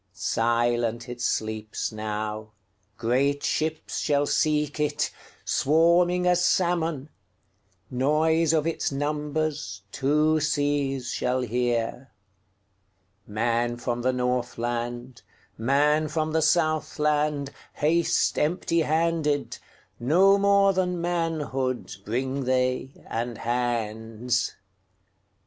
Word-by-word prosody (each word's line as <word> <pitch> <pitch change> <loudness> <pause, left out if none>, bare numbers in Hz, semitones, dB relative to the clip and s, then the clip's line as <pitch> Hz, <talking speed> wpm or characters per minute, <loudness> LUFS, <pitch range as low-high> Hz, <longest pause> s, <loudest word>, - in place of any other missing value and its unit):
Silent 120 0 0
it 120 0 -7
sleeps 110 -2 -2
now; 110 0 -4 0.4
Great 135 +5 +1
ships 155 0 -2
shall 145 -1 +1
seek 150 -1 +1
it, 150 -1 0 0.3
Swarming 170 +4 +3
as 180 0 +3
salmon; 170 -6 +1 0.8
Noise 155 +5 +2
of 155 -2 +2
its 165 - -1
numbersTwo 150 - -1
seas 145 -4 0
shall 125 +1 0
hear. 120 +1 -1 1.2
Man 120 +2 0
from 120 0 -3
the 130 +1 +2
Northland, 120 -1 -2 0.3
Man 145 +6 +2
from 155 +1 -1
the 160 0 +1
Southland, 150 -3 +1 0.2
Haste 165 +3 +1
empty 170 +2 +1
handed; 160 -2 0 0.4
No 185 +10 +4
more 200 0 +4
than 180 -1 0
manhoodBring 135 - -2
they, 130 +1 0 0.2
and 115 0 -3
hands. 115 0 -1
140 Hz, 85 wpm, -26 LUFS, 120-155 Hz, 1.2 s, No